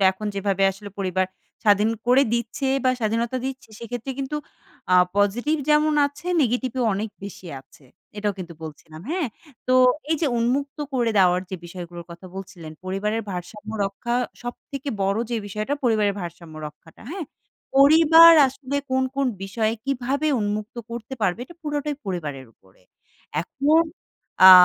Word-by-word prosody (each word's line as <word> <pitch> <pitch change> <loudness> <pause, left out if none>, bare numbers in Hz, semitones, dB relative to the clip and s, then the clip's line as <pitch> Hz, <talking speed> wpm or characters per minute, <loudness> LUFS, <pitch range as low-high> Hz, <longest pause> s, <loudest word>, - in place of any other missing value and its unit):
এখন 210 +3 -6
যেভাবে 195 -1 0
আসলে 200 +2 -9
পরিবার 185 -1 0 0.4
স্বাধীন 210 +1 +5 0.2
করে 255 +3 +6
দিচ্ছে 235 +3 -1 0.2
বা 255 - +5
স্বাধীনতা 230 +3 0
দিচ্ছে 265 -1 -5
সেক্ষেত্রে 240 +2 -5
কিন্তু 275 +2 -2 0.6
আ - - +7 0.2
পজিটিভ 235 +10 +2
যেমন 300 0 +4
আছে 285 +4 -11 0.2
নেগেটিভও 250 0 0
অনেক 210 +2 -3
বেশি 195 -2 -9
আছে। 135 - -22 0.3
এটাও 205 0 0
কিন্তু 175 -2 -7
বলছিলাম, 155 0 -10
হ্যাঁ। 340 -7 0 0.4
তো - - +4 0.4
এই 320 - +3
যে, 315 - +2
উন্মুক্ত 275 +5 0
করে 240 -3 +1
দেওয়ার 180 -1 +5
যে, - - -3
বিষয়গুলোর 175 -1 -8
কথা 170 +2 -10
বলছিলেন, 185 -5 -8
পরিবারের 210 +4 -1
ভারসাম্য 195 +4 -7
রক্ষা 195 +5 -3 0.3
সবথেকে 275 +3 -6
বড় 195 +2 +1
যে, 235 - 0
বিষয়টা 215 +7 -2
পরিবারের 215 -4 +3
ভারসাম্য 170 -2 -8
রক্ষাটা, 150 +2 -14
হ্যাঁ। 360 -4 -5 0.5
পরিবার 320 +4 +9 0.2
আসলে 270 +1 -5
কোন, 260 0 +2
কোন 275 -1 +2 0.2
বিষয় 215 +3 0
কীভাবে 275 +2 -1
উন্মুক্ত 210 +3 -3
করতে 235 +2 -6
পারবেন, 210 +6 0 0.2
পুরোটাই 295 -1 -2
পরিবারের 150 -8 -4
উপরে। 95 -1 -26 0.6
এখন 290 - +3 0.7
আ - - +13
220 Hz, 145 wpm, -24 LUFS, 190-270 Hz, 0.7 s, আ